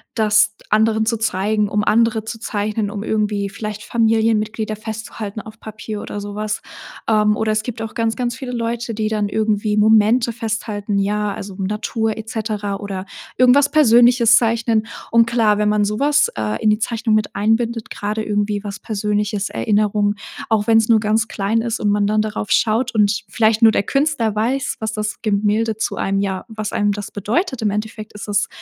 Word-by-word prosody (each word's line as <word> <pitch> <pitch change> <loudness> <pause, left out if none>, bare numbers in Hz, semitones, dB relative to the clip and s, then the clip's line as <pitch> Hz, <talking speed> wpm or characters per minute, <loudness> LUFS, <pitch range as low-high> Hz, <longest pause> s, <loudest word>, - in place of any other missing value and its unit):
das 215 -1 +3 0.2
anderen 220 +1 +3
zu 230 +1 0
zeigen, 210 0 0
um 210 0 0
andere 225 0 +2
zu 225 0 -6
zeichnen, 210 -1 -2
um 205 0 -5
irgendwie 210 -2 -1
vielleicht 210 0 -6
Familienmitglieder 220 -1 +1
festzuhalten 220 -1 -6
auf 215 +1 -13
Papier 215 -1 -7
oder 205 - -6
sowas. 210 +1 -4 0.4
Ähm, 210 -1 +3
oder 220 0 0
es 215 0 +1
gibt 225 -1 -5
auch 220 - -6
ganz, 225 -1 -1
ganz 240 -2 -2
viele 260 -2 -6
Leute, 235 -1 -3
die 215 0 -1
dann 210 -2 -1
irgendwie 215 0 0
Momente 220 +3 +4
festhalten, 215 -2 -3
ja, 205 +1 0
also, 195 -1 -8
Natur 215 +2 -2
et 220 0 -7
cetera 210 -3 -3
oder 195 -2 -6 0.3
irgendwas 260 +3 +5
Persönliches 240 -4 +5
zeichnen, 230 -1 +1 0.2
und 230 0 +5
klar, 225 -3 +2
wenn 210 0 +2
man 210 -1 +2
sowas, 285 +8 +2
äh, 110 -1 -2
in 215 - +5
die 210 - +1
Zeichnung 225 0 -1
mit 215 -1 0
einbindet, 225 +2 0
gerade 215 +2 -3
irgendwie 205 -1 -1
was 200 -1 -6
persönliches, 210 -1 -2
Erinnerung, 210 -1 +1 0.3
auch 215 -2 +2
wenn's 225 0 +3
nur 225 -2 +6
ganz 220 +1 +1
klein 220 +2 -1
ist 230 0 -2
und 210 - 0
man 205 0 +2
dann 215 +1 +2
darauf 210 -1 -4
schaut 235 +3 +2
und 205 -1 +2
vielleicht 220 +2 +2
nur 225 - +7
der 200 - +1
Künstler 275 -4 0
weiß, 240 +6 -1
was 220 0 -3
das 215 0 -4
Gemälde 215 +1 0
zu 220 - -2
einem 195 0 -1
ja, 190 -2 -2
was 215 -2 -5
einem 205 0 +1
das 205 0 -5
bedeutet 245 - -1
im 215 - +1
Endeffekt 215 +1 -5
ist 210 0 -8
es, 205 -1 +1
215 Hz, 180 wpm, -19 LUFS, 210-225 Hz, 0.4 s, nur